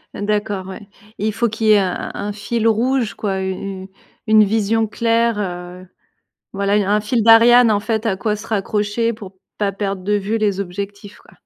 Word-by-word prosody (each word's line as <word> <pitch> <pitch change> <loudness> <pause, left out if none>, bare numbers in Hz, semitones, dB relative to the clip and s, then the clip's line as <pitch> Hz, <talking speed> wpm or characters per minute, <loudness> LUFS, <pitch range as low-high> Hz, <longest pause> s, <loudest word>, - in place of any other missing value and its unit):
D'accord, 205 -2 -2
ouais. 195 +1 -9 0.3
Et 210 - -1
il 215 - +1
faut 235 +1 0
qu'il 220 0 -2
y - - +6
ait - - +6
un 185 -2 0 0.2
un - - -4
un - - -4
fil 230 +2 -2
rouge, 235 +1 +1
quoi, 195 -2 -3
u 190 - -2 0.3
u 190 - -10 0.4
une 215 -1 +5
vision 220 +1 +1
claire, 230 0 +1
heu, 180 -1 -6 0.7
voilà, 200 +1 0 0.2
un 210 - +2
fil 225 +2 0
d'Ariane, 230 +2 +7
en 205 -1 +2
fait, 220 +1 -2
à 195 - 0
quoi 210 +2 -1
se 210 - -10
raccrocher 210 +2 -1
pour 195 -3 -11 0.2
pas 205 -1 0
perdre 195 -1 -4
de 205 +3 0
vue 205 +2 -1
les 205 -3 0
objectifs, 200 +2 -7
quoi. - - -21
210 Hz, 200 wpm, -19 LUFS, 200-225 Hz, 0.7 s, d'Ariane